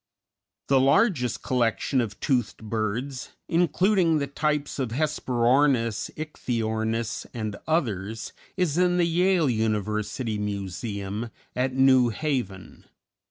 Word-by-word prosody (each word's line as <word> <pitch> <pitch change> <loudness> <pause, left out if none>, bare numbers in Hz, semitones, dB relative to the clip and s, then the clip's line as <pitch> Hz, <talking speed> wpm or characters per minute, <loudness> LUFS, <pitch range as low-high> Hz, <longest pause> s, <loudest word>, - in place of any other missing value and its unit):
The 135 -1 +4
largest 135 - +2
collection 125 +1 +1
of 105 -3 -5
toothed 125 -7 0
birds, 115 +4 -3
including 175 +1 +3
the 140 - 0
types 150 +1 -1
of 130 -3 -1
Hesperornis, 125 -3 +1
Ichthyornis 115 -6 -2
and 110 -3 -3
others, 110 - -1 0.2
is 175 -3 +1
in 180 0 +3
the 175 - +3
Yale 175 -1 +3
University 110 0 -1
Museum, 100 +2 -4 0.3
at 130 +1 0
New 130 -2 +5
Haven. 115 - -4
125 Hz, 105 wpm, -26 LUFS, 110-150 Hz, 0.3 s, New